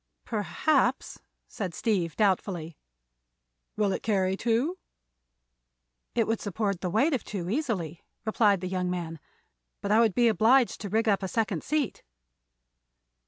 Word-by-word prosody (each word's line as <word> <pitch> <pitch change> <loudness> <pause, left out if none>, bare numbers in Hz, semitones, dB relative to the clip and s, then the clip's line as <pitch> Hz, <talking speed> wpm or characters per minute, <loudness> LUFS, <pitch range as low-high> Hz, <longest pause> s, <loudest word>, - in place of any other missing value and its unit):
"Perhaps," 250 +5 0 0.3
said 185 -6 -5
Steve, 180 -8 0
doubtfully. 180 -5 0 1.0
"Will 210 -2 +2
it - - -2
carry 190 -3 +1
two?" 240 - 0 1.4
"It 230 - +3
would 225 0 -1
support 200 -2 -2
the 180 - -1
weight 270 - +2
of 255 - -1
two 185 -3 -4
easily," 205 - -2 0.2
replied 210 -3 +3
the 185 - -3
young 180 -1 -1
man; 170 -3 -4 0.6
"but 200 - -3
I 215 - +5
would 225 -5 +3
be 240 -1 +4
obliged 230 +3 +4
to 205 - -4
rig 225 +3 +1
up 200 -2 +3
a 190 - -2
second 200 -4 -1
seat." 300 -4 -1
210 Hz, 140 wpm, -28 LUFS, 185-230 Hz, 1.4 s, I